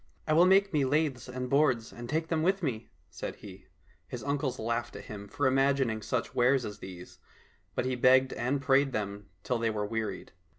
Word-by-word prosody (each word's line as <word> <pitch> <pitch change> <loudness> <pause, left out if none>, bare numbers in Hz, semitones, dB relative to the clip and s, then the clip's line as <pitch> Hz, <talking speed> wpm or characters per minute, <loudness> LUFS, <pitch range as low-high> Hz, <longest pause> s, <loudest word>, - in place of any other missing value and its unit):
— - - -39
" - - -35
I 155 - +2
will 170 +3 +6
make 195 +1 +4
me 145 -2 +3
laths 140 -2 0
and 125 0 -4
boards 130 -4 +2
and 120 0 -8
take 160 +2 -1
them 160 -2 +1
with 190 +3 +1
me," 115 -7 -3 0.2
said - - -6
he. - - -12 0.2
— - - -30
His - - -6
uncles 140 -2 -1
laughed 115 +1 -2
at - - -8
him 100 -1 -8
for 145 +8 -2
imagining 135 -4 +2
such 115 +4 -2
wares 125 0 +3
as 105 0 -7
these, 90 -2 -10 0.6
but - - 0
he 130 0 0
begged 130 +1 +4
and 130 +4 -1
prayed 135 0 +3
them 100 -2 -4
till 125 -2 -1
they 115 0 +1
were 105 -1 -2
wearied. 110 0 -4
130 Hz, 215 wpm, -30 LUFS, 115-140 Hz, 0.6 s, will